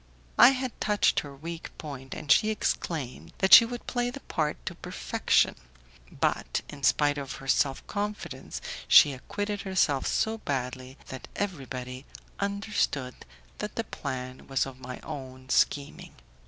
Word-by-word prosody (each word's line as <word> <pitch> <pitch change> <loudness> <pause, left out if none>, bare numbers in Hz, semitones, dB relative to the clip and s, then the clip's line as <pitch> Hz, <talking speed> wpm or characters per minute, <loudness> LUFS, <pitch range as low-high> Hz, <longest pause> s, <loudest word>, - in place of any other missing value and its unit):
I 240 - +11
had 260 -2 -3
touched 210 -1 +3
her 140 -1 -8
weak 165 +4 -7
point, 135 -3 -7
and 145 - -2
she 215 - +6
exclaimed 135 - -2
that 190 -2 +3
she 230 - +12
would 240 +1 -6
play 245 -1 -1
the 270 +3 -8
part 150 -1 -1
to - - -3
perfection; - - +1 0.6
but - - -1
in 145 - -9
spite 145 +1 +3
of 135 -1 -5
her 135 -1 -10
self 135 0 +2
confidence 210 0 -4 0.3
she 145 -3 +8
acquitted 205 +10 -4
herself 175 -8 +1
so 220 0 0
badly 130 -3 -4
that 130 - -7
everybody 130 -8 -5 0.3
understood 200 -10 -1 0.5
that - - -4
the - - -1
plan 130 0 -6
was 135 -1 +1
of 130 -1 -9
my 125 0 -7
own 130 -3 -8
scheming. 140 +1 0
145 Hz, 145 wpm, -28 LUFS, 130-205 Hz, 0.6 s, she